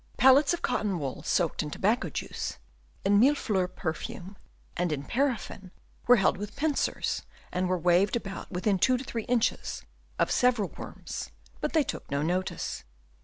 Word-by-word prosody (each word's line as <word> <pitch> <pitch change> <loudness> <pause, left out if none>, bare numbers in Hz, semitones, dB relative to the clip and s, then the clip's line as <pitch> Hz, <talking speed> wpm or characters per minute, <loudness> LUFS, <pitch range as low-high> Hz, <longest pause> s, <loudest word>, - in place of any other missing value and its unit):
Pellets 270 +3 +6
of 345 - -2
cotton 210 -6 0
wool 135 -5 -4
soaked 170 -3 +1
in 150 - -4
tobacco 215 +10 +1
juice, - - -4 0.5
in 200 +1 +5
millefleurs 210 -8 +2
perfume, 175 +4 -5 0.4
and 175 -1 0
in 140 -2 -2
paraffin, 240 - -1 0.4
were 245 - +9
held 195 - +3
with 205 +1 -6
pincers 295 0 0 0.3
and 180 0 0
were 185 - +2
waved 180 +5 +3
about 195 -4 -5
within 190 +1 +1
two 255 +7 +4
or 250 - -3
three 230 -4 -4
inches 245 -2 0 0.3
of - - +1
several 245 -6 +3
worms, - - -7 0.3
but - - -2
they 315 -2 +4
took - - -6
no 140 0 0
notice. 180 +3 -2
200 Hz, 160 wpm, -28 LUFS, 180-250 Hz, 0.5 s, were